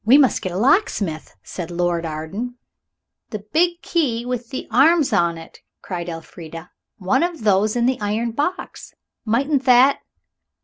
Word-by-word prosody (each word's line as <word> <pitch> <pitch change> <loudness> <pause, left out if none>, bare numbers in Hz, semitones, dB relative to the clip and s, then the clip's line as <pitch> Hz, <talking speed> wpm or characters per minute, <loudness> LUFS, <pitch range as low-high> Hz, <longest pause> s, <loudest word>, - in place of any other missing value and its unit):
"We 245 +6 +6
must 275 -4 +3
get 185 - -3
a 175 - -4
locksmith," 210 - +1
said 175 -2 -6
Lord 175 -1 -1
Arden. 185 +11 -5 0.7
"The 210 -2 -7
big 345 +2 +2
key 245 -9 0
with 245 -1 -4
the 260 - -6
arms 285 +2 +4
on 170 -4 +2
it!" 165 0 -12 0.2
cried 175 -2 -5
Elfrida; 165 0 -9 0.3
"one 205 +7 +1
of 345 -7 -2
those 210 +1 +2
in 240 -1 +1
the 255 -2 0
iron 215 +3 -1
box. 295 +10 -4 0.3
Mightn't 270 +5 +1
that 255 +2 +5
225 Hz, 150 wpm, -21 LUFS, 175-265 Hz, 0.7 s, We